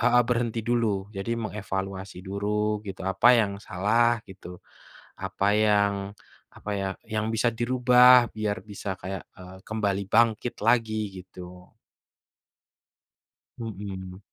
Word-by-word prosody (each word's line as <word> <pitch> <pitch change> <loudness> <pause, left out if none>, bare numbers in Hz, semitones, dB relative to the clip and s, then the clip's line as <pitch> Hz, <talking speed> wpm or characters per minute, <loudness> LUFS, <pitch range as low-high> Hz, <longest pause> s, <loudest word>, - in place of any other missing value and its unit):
heeh, 120 0 +5
berhenti 120 -2 0
dulu 120 -1 +2 0.3
jadi 95 +4 -4
mengevaluasi 95 -2 -5
duru 105 +2 -1
gitu 95 - -7
apa 95 +6 +4
yang 100 -3 0
salah 115 +5 +2
gitu, 95 -2 -11 0.8
apa 95 +1 -1 0.2
yang 105 -1 +3 0.6
apa 105 - -7
ya 95 - -2 0.3
yang 110 0 0
bisa 115 +2 +2
dirubah 125 0 +6
biar 105 -1 -1
bisa 100 0 -7
kayak, 95 +2 -5 0.2
eee, 95 0 -11
kembali 100 -3 -1
bangkit 115 +1 +3
lagi 115 -2 +2 0.2
gitu. 90 0 -13 1.8
Mhm. 95 -4 -7
105 Hz, 115 wpm, -26 LUFS, 95-115 Hz, 1.8 s, dirubah